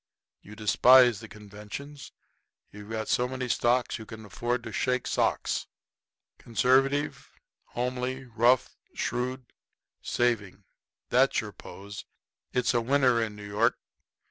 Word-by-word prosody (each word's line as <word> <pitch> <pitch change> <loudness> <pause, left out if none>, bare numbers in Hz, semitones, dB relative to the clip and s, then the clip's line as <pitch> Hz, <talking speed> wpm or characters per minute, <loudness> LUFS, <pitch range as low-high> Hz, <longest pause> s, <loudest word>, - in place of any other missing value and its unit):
You 105 - -12
despise 120 +2 +6
the 110 - -10
conventions. 105 +8 -10 0.6
You've 105 0 -11
got 110 -1 -3
so 125 - +1
many 130 0 -4
stocks 120 0 +1
you 110 - -10
can 110 -1 -10
afford 120 +3 -2
to - - -7
shake 125 -1 0
socks. - - 0 0.7
Conservative, 135 +5 +1 0.4
homely, 125 +2 -3
rough, 120 +2 +2 0.2
shrewd, 125 +1 -3 0.5
saving 105 -5 -1 0.5
that's - - +3
your - - -5
pose. 100 +1 -10 0.5
It's 125 0 +1
a 120 - +2
winner 125 -1 +3
in 110 -2 -3
New 105 0 -10
York. 105 +3 +1
120 Hz, 120 wpm, -28 LUFS, 110-125 Hz, 0.7 s, despise